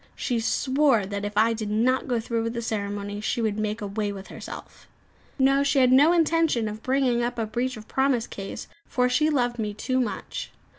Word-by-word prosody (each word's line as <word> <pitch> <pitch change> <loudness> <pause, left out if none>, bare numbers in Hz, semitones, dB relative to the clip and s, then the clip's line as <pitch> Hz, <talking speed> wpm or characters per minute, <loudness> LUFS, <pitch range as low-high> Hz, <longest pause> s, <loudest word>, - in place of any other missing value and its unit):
She 245 -3 -1
swore 260 -1 +2
that 200 +1 -4
if 205 0 -5
I 225 +2 +4
did 220 -2 -4
not 245 +6 +1
go 245 -3 +1
through 230 0 -2
with 230 0 -2
the 235 - -2
ceremony, 205 -1 -3
she 215 - -1
would 215 -2 0
make 215 +1 -2
away 205 +1 -2
with 195 -1 -9
herself. - - -10 0.5
No; 275 0 +4
she 280 0 +1
had 255 -1 +5
no 285 +5 +6
intention 330 -8 +2
of 210 +1 -6
bringing 255 -2 +1
up 240 +1 -2
a 225 - 0
breach 245 +3 -2
of 215 - -11
promise 265 -3 +1
case, 195 -4 -7 0.2
for 250 -1 +1
she 295 +5 +2
loved 245 -5 0
me 210 -2 -2
too 255 +4 -1
much. 240 -4 -4
235 Hz, 205 wpm, -25 LUFS, 215-260 Hz, 0.5 s, no